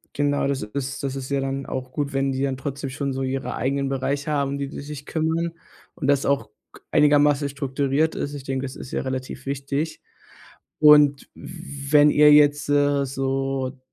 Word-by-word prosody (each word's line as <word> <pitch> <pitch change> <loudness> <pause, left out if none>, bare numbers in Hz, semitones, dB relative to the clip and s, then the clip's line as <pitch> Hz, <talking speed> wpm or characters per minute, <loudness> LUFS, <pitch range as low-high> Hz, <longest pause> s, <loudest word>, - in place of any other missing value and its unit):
Genau, 145 -1 +1
das 140 -1 -1
ist 135 +6 -5
das 135 -1 -2
ist 135 0 -6
ja 140 -1 0
dann 135 0 -3
auch 130 0 -5
gut, 145 -1 -3
wenn 135 0 +1
die 130 +1 -3
dann 135 -2 -1
trotzdem 135 0 -5
schon 140 0 -3
so 135 - -3
ihre 130 0 -3
eigenen 135 +2 -1
Bereiche 140 +3 -2
haben, 140 -2 0
um 140 - -3
die 140 0 -3
die - - -7
sich 145 0 -8
kümmern 165 +1 -1 0.4
und 135 - -3
das 140 -1 +2
auch 140 0 0 0.2
k - - -15
einigermaßen 145 -1 +4
strukturiert 140 +2 -1
ist. 145 - -3
Ich 140 -2 -7
denke, 135 0 -3
das 130 - -7
ist 130 - -9
ja - - -1
relativ 130 0 -5
wichtig. 140 +3 -3 0.8
Und 150 -2 +6
wenn 150 -3 +1
ihr 150 0 +6
jetzt, 145 0 +4
äh, 145 -1 +2
so 135 0 -2
140 Hz, 190 wpm, -23 LUFS, 135-145 Hz, 0.8 s, Und